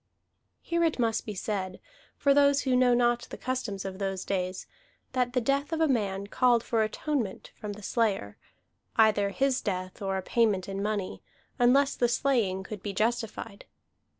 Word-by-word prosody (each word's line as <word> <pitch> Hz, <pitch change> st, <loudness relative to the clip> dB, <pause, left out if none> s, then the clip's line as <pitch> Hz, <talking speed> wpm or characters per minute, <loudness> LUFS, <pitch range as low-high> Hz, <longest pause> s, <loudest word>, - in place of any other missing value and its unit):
Here 340 Hz, 0 st, 0 dB
it 325 Hz, -2 st, +1 dB
must 230 Hz, -3 st, 0 dB
be 210 Hz, -, -4 dB
said, 190 Hz, -2 st, -3 dB, 0.4 s
for 280 Hz, -, +4 dB
those 280 Hz, 0 st, +4 dB
who 260 Hz, -2 st, +1 dB
know 250 Hz, -1 st, +5 dB
not 240 Hz, 0 st, +2 dB
the -, -, -7 dB
customs 245 Hz, -7 st, -3 dB
of 190 Hz, 0 st, -5 dB
those 195 Hz, -1 st, -2 dB
days, 185 Hz, -1 st, -2 dB, 0.5 s
that 250 Hz, -1 st, 0 dB
the 250 Hz, -, +2 dB
death 275 Hz, +6 st, 0 dB
of 325 Hz, -, -1 dB
a 320 Hz, -, +4 dB
man 200 Hz, -7 st, 0 dB
called 240 Hz, +2 st, +3 dB
for 225 Hz, -2 st, +1 dB
atonement 220 Hz, -1 st, -2 dB
from 210 Hz, -1 st, -6 dB
the 210 Hz, 0 st, -11 dB
slayer, 195 Hz, -, 0 dB, 0.6 s
either 210 Hz, -2 st, +4 dB
his 265 Hz, +5 st, +1 dB
death 185 Hz, -1 st, -4 dB
or 195 Hz, -1 st, -1 dB
a 190 Hz, -, -4 dB
payment 210 Hz, -4 st, +1 dB
in 195 Hz, 0 st, -4 dB
money, 205 Hz, -2 st, -2 dB, 0.4 s
unless 270 Hz, +3 st, +4 dB
the 240 Hz, -, +2 dB
slaying 230 Hz, -7 st, +1 dB
could 205 Hz, -1 st, -7 dB
be 200 Hz, 0 st, -4 dB
justified. 220 Hz, -1 st, -2 dB
220 Hz, 175 wpm, -28 LUFS, 195-255 Hz, 0.6 s, know